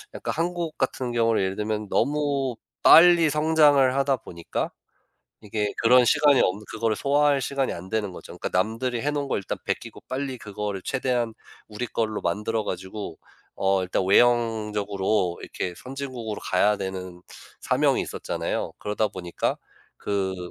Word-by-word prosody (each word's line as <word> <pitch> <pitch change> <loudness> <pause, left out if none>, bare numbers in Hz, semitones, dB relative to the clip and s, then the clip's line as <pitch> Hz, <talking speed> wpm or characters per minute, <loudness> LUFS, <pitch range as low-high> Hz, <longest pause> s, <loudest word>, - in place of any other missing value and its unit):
약간 - - -3
한국 170 -1 -2
같은 130 -2 -1
경우는 115 -2 +2
예를 95 0 -1
들면 105 0 -3
너무 140 0 0 0.3
빨리 170 -1 +8
성장을 150 -3 +4
하다 135 -1 +2
보니까 85 -7 -5 0.7
이게 105 -1 -2
그런 125 +2 +6
시간이 145 +2 +4
없는 100 +3 +1
그거를 110 -1 -1
소화할 145 +1 +2
시간이 135 +1 -1
안 90 +2 -8
되는 105 -2 -2
거죠. - - -10
그러니까 - - -3
남들이 115 +5 0
해 145 - +1
놓은 145 -1 -2
걸 - - 0
일단 100 - -4
베끼고 - - -4
빨리 130 0 -3
그거를 105 -2 -5
최대한 125 -3 -1 0.3
우리 110 +3 -4
걸로 110 -1 -2
만들어 105 +5 -1
가지고 95 -1 -6 0.4
어 95 0 +2
일단 90 +1 -1
외형적으로 105 -4 +2
이렇게 90 -1 -5
선진국으로 130 -5 -6
가야 105 +3 +2
되는 95 -2 -6 0.4
사명이 - - +2
있었잖아요. - - -3
그러다 105 +1 -1
보니까 90 -3 -3 0.4
그 95 -3 -3
110 Hz, 340 characters per minute, -25 LUFS, 100-135 Hz, 0.7 s, 빨리